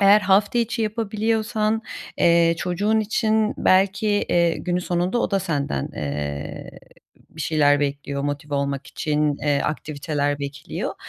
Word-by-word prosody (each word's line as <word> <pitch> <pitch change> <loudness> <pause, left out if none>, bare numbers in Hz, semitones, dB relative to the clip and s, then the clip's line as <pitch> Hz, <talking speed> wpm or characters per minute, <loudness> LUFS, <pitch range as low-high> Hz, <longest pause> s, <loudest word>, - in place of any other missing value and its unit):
eğer 200 +1 +7
hafta 200 +4 +3
içi 235 0 0
yapabiliyorsan, 220 0 0 0.4
eee, 170 0 +4
çocuğun 205 +6 +1
için 215 0 +1
belki, 195 +3 +3
eee, 175 -5 +2
günün 180 -1 -1
sonunda 180 +6 0
o - - 0
da 195 - +2
senden, 145 - -2
eee, 70 0 -4 0.6
bir 160 - -11
şeyler 145 -2 +3
bekliyor, 140 0 -2
motive 145 +1 -3
olmak 140 0 -2
için, 150 -2 0
eee, 145 -1 +2
aktiviteler 145 -1 -2
bekliyor. 140 +2 -5
170 Hz, 130 wpm, -23 LUFS, 145-210 Hz, 0.6 s, eğer